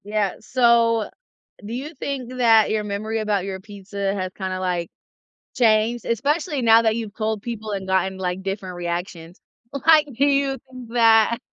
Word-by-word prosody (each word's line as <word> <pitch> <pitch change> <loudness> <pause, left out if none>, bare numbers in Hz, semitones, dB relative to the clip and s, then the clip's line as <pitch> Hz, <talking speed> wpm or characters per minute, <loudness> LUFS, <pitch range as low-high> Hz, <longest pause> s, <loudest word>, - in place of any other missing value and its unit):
Yeah, 205 -2 -1
so 235 -3 +2 0.6
do 215 - -7
you 280 +7 -5
think 255 -3 -5
that 225 -3 +5
your 215 -1 0
memory 210 +2 -3
about 210 -3 0
your 190 -1 -5
pizza 200 -1 -5
has 185 -2 -4
kinda, 185 -1 -4
like, 175 -2 -2 0.7
changed, 225 0 +2
especially 290 - -1
now 225 -1 +6
that 220 -1 +1
you've 225 -3 -5
told 215 -1 -2
people 220 -2 -6
and 195 -2 -4
gotten, 190 0 0
like, 185 0 -3
different 195 -1 -4
reactions? 175 0 -5 0.5
Like, 310 -2 +6
do 265 +5 +2
you 275 -1 +1
think 255 -2 -11
that 225 -1 +4
215 Hz, 160 wpm, -22 LUFS, 190-235 Hz, 0.7 s, now